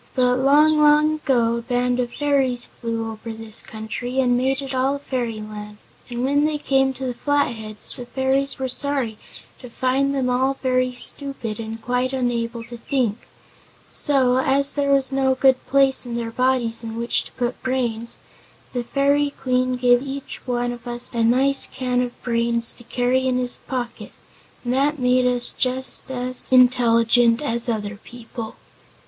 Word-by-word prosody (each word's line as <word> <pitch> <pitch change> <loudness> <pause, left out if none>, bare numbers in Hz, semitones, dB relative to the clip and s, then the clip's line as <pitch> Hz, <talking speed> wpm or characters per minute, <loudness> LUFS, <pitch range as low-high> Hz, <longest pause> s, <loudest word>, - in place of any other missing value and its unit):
But 250 -1 +3
long, 300 +3 +5
long 300 +1 +5
ago 240 -6 +1
a - - -4
band 245 +1 0
of 245 -1 -1
fairies 270 -4 0
flew 230 -1 -4
over 220 +1 -8
this 225 -1 -5
country 225 +4 -5
and 250 -2 +3
made 260 +2 +1
it 275 -1 -5
all 260 +2 +1
a - - -3
fairyland, 215 -6 -5 0.3
and 240 0 -3
when 285 +2 +2
they 305 -1 0
came 270 -2 +2
to 265 - -5
the 250 - -2
Flatheads 235 -6 -1
the 245 - -8
fairies 265 +2 0
were 265 -1 -2
sorry 260 -4 -2 0.4
to 250 - -10
find 265 +3 0
them 260 -2 0
all 260 +2 +1
very 255 -1 +1
stupid 245 -5 -2
and 225 0 -6
quite 250 +1 -1
unable 240 -2 -2
to 240 +1 -10
think. 235 -3 -2 0.6
So, 260 -3 +4
as 275 +1 +2
there 280 -1 +1
was 275 -1 +2
no 265 -1 +2
good 260 -1 +3
place 275 -1 +3
in 240 -2 -5
their 230 -1 -3
bodies 245 -2 0
in 225 0 -6
which 235 +1 0
to - - -13
put 245 -1 -3
brains 235 -3 -1 0.6
the 245 -1 -2
Fairy 280 +3 +2
Queen 255 -2 -1
gave 245 0 +4
each 275 0 -7
one 245 -1 -1
of 240 0 -9
us 240 +1 -5
a 230 -1 +1
nice 265 +4 +3
can 250 -1 -1
of 245 -1 -4
brains 235 -1 +1
to 240 - -12
carry 255 +2 +1
in 255 -1 +1
his 250 -1 -1
pocket 245 -2 -5 0.5
and 245 0 -1
that 285 +3 +1
made 250 -1 +3
us 245 -1 +3
just 260 +1 -1
as 255 0 -3
intelligent 240 -2 +4
as 235 -4 -1
other 210 -2 -3
people. 230 0 -9
250 Hz, 170 wpm, -22 LUFS, 235-265 Hz, 0.6 s, long